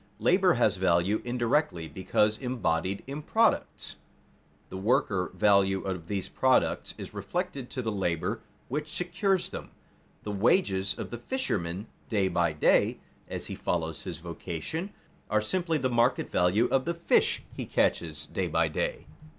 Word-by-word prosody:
_ - - -30
Labor - - +4
has - - +3
value 85 +5 +2
indirectly 120 - 0
because 105 +5 +1
embodied 100 -7 -1
in 140 +3 -5
products. 225 +8 +1 0.7
The 95 - -6
worker 95 -2 +1
value 95 0 +3
of 90 -4 -4
these 100 -2 -2
products 130 -1 +1
is - - -8
reflected 175 -8 -3
to 130 - -4
the 110 - -1
labor 90 -5 -1 0.3
which 150 +3 -3
secures 180 +2 0
them. - - -7 0.5
The 105 - -4
wages 100 - +2
of - - -6
the 120 - -5
fisherman 100 - -2 0.2
day 100 -4 +2
by 85 -2 +2
day, 75 - +3 0.3
as - - -5
he - - -5
follows 80 -2 -2
his 85 - -5
vocation, 85 - -5 0.4
are 110 - +3
simply 165 +9 0
the 130 -3 0
market 120 +1 +2
value 90 +6 +3
of 130 -1 +2
the 170 +1 -1
fish 170 - +2
he - - -5
catches 75 -2 0
day - - -2
by - - +2
day. - - -2
105 Hz, 150 wpm, -28 LUFS, 90-135 Hz, 0.7 s, Labor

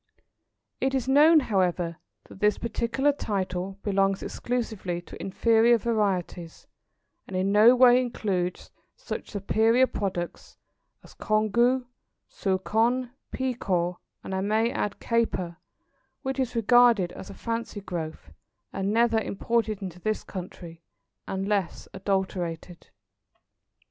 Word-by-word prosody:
It 265 0 0
is 260 -2 -1
known, 300 +4 +6
however, 180 -7 0 0.3
that - - -15
this 210 0 +2
particular 235 +4 0
title 190 -7 -3
belongs 195 -1 +1
exclusively 220 -8 -3
to - - -11
inferior 230 +4 +3
varieties, 195 -7 -2 0.6
and 190 - -4
in 190 +2 +1
no 215 +4 +7
way 250 0 +6
includes 190 -7 -3 0.2
such - - -6
superior 225 +4 +3
products 190 -7 -5 0.5
as - - -16
Congou, 235 +4 +1 0.4
Souchong, 225 +6 0 0.2
Pekoe, 190 -9 -1 0.3
and 190 - -6
I 190 - -1
may 220 +4 +1
add 205 -4 -3
Caper, 190 -7 -1 0.7
which 265 0 -3
is 250 -2 -1
regarded 230 -5 +4
as - - -10
a 200 - -9
fancy 230 -2 -4
growth, 160 - -6 0.4
and 195 +1 -1
never 230 0 +3
imported 220 -1 -1
into 180 -2 -7
this 215 +3 -2
country, 175 -3 -9 0.5
unless 195 -1 -2
adulterated. 185 -3 -3
210 Hz, 115 wpm, -26 LUFS, 185-235 Hz, 0.7 s, no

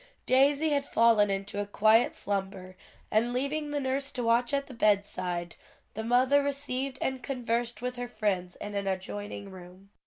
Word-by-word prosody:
Daisy 280 +4 +4
had 280 -1 0
fallen 225 -3 +4
into 195 +1 -2
a 205 - -4
quiet 220 +3 +4
slumber, 195 -2 -4 0.4
and 230 +3 +2
leaving 290 +4 -1
the 290 0 -1
nurse 275 +1 -2
to 250 - -2
watch 235 +1 +2
at 280 0 0
the 265 - -11
bedside, 185 -6 0 0.4
the 220 - -4
mother 255 +5 +4
received 275 -2 -3
and 265 -1 -2
conversed 240 -2 -2
with 250 0 -3
her 245 0 -4
friends 200 -6 -2
in 205 - -7
an 200 -1 -2
adjoining 200 +1 -4
room. 185 +1 -13
230 Hz, 165 wpm, -29 LUFS, 200-265 Hz, 0.4 s, Daisy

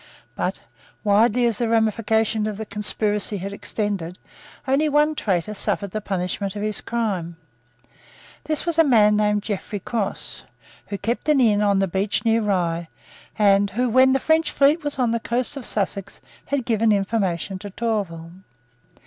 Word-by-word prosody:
But, - - -2 0.4
widely 220 +4 +3
as 230 -3 0
the 235 -2 0
ramifications 220 -1 +1
of 210 -2 -4
the 220 - -5
conspiracy 210 0 -2
had 195 +2 -5
extended, 200 -4 -3 0.5
only 285 +4 +2
one 295 +1 +3
traitor 195 - -1
suffered 200 -1 -2
the 215 - -3
punishment 195 0 -3
of 205 - -4
his 215 -1 -2
crime. 195 -8 -2 1.1
This 310 -1 -1
was 335 -1 0
a - - +8
man 215 -7 +5
named 210 -1 +1
Godfrey 205 0 -4
Cross, 210 +1 -4 0.5
who 200 - -4
kept 235 +9 -2
an 295 -2 +4
inn 215 -4 +4
on 200 -1 +3
the 195 0 +2
beach 195 +5 -1
near 225 0 +3
Rye, 175 -5 0 0.5
and 200 -1 +4
who, 245 +5 0
when 260 +3 +5
the 270 - +2
French 315 +2 +2
fleet 290 +4 +3
was 290 -2 -3
on 245 -3 +1
the 235 - 0
coast 245 +4 -1
of 270 -4 -6
Sussex, 200 -2 -3 0.3
had 280 -4 -1
given 225 -2 +2
information 195 -2 -1
to 205 - -7
Tourville. 195 -7 -3
210 Hz, 165 wpm, -22 LUFS, 200-235 Hz, 1.1 s, a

